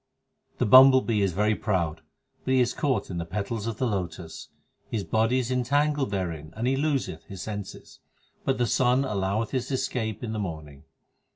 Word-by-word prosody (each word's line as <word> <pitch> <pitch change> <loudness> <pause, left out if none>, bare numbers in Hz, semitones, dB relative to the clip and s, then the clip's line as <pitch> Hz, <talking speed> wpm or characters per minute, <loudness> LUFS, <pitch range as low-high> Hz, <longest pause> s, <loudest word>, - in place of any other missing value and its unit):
15 - - -37
The - - +1
bumble 130 +3 +8
bee 110 -4 0
is 95 -3 +1
very 105 +4 +2
proud, 90 -8 -1 0.4
but 130 - +1
he - - +4
is 125 -1 +2
caught 135 -8 -1
in 85 - -3
the - - -2
petals 105 +5 -4
of 115 -2 -3
the 130 - 0
lotus; 90 -6 -4 0.4
His 110 -4 -2
body 110 +7 +1
is 130 -1 -1
entangled 140 +2 +1
therein 85 -6 -4
and 115 - -2
he 130 +2 +2
loseth 140 -1 -1
his 95 -4 -8
senses; 105 -2 -7 0.4
but 135 -1 0
the 120 - +2
sun 125 +2 +2
alloweth 105 0 -1
his 130 -2 -2
escape 120 -4 -2
in 110 -2 -3
the 110 - -3
morning. 80 -7 -6
110 Hz, 190 wpm, -26 LUFS, 95-130 Hz, 0.4 s, bumble